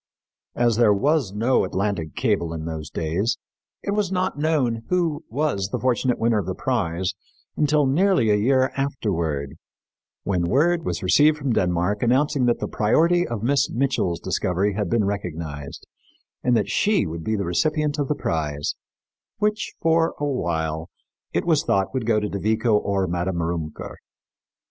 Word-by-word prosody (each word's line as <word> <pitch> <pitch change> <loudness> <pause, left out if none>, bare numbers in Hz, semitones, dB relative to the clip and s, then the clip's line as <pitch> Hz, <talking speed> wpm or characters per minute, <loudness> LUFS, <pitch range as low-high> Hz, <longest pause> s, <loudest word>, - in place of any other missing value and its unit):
As 120 -2 +2
there 110 -4 +5
was 140 -1 +1
no 115 +6 +2
Atlantic 95 -4 -2
cable 100 -9 0
in 80 -1 -5
those 80 -2 -5
days, 90 +11 -1 0.5
it - - -2
was 205 -2 0
not 185 0 0
known 145 -7 0
who 170 -4 0
was 130 -8 -1
the - - -1
fortunate 125 0 +1
winner 115 -1 +2
of 100 - -4
the - - -2
prize 85 +4 -1 0.4
until 150 -1 +2
nearly 140 - +3
a - - +4
year 130 +5 +2
afterward, 85 - -2 0.7
when 90 -3 0
word 165 +5 +2
was - - -3
received 150 +1 +4
from 140 -4 -1
Denmark 90 +2 0
announcing 135 +2 +2
that 120 - +2
the - - -3
priority 170 +11 +2
of 115 -3 -4
Miss 140 +2 +2
Mitchell's 120 -9 0
discovery 95 +3 0
had 100 -2 -2
been 110 0 +2
recognized 80 -8 -5 0.6
and 125 -1 +3
that 105 - -1
she 210 -2 +2
would 80 0 -5
be 110 - 0
the 100 -2 -2
recipient 150 - 0
of 145 - 0
the 150 - 0
prize, 75 - -2 0.6
which, 210 0 -1
for 165 0 +2
a 145 - -1
while, 80 - -2 0.4
it - - -1
was 160 -4 +3
thought 95 +3 0
would 130 -4 -2
go 110 -2 +3
to 105 - -2
De 100 - -4
Vico 110 +2 +2
or 100 -2 +1
Madame 90 0 -2
Rümker. 80 -2 -4
110 Hz, 165 wpm, -23 LUFS, 90-145 Hz, 0.7 s, there